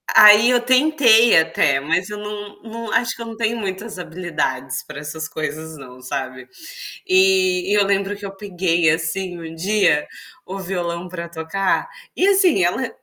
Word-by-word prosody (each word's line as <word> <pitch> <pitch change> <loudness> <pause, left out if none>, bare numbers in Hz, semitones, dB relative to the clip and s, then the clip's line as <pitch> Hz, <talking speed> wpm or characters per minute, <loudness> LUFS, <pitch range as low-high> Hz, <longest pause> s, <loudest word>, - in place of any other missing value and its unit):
aí 210 +3 +8
eu 245 - +3
tentei 255 - +4
até, 155 -4 +1
mas 170 +7 -1
eu 210 - -6
não 210 -1 -8
não 230 -1 -7
acho 230 0 0
que 235 - -11
eu - - -5
não 225 -1 -8
tenho 230 0 -1
muitas 200 +1 -5
habilidades 150 -7 -4
para 150 -1 -9
essas 155 +2 -6
coisas 160 0 -6
não, 130 -2 -13
sabe. 130 -1 -6 0.6
E 375 - +3
e - - +3
eu 205 -1 +3
lembro 200 +1 0
que 200 0 -9
eu 195 0 -8
peguei, 175 -4 0
assim, 170 +2 -2
um 165 0 -9
dia 190 -4 +1 0.4
o 195 +1 -7
violão 175 -1 -4
para 170 -1 -7
tocar, 170 - -2 0.3
e 380 - +2
assim 370 - +3
ela: 205 +9 0
190 Hz, 170 wpm, -20 LUFS, 160-225 Hz, 0.6 s, aí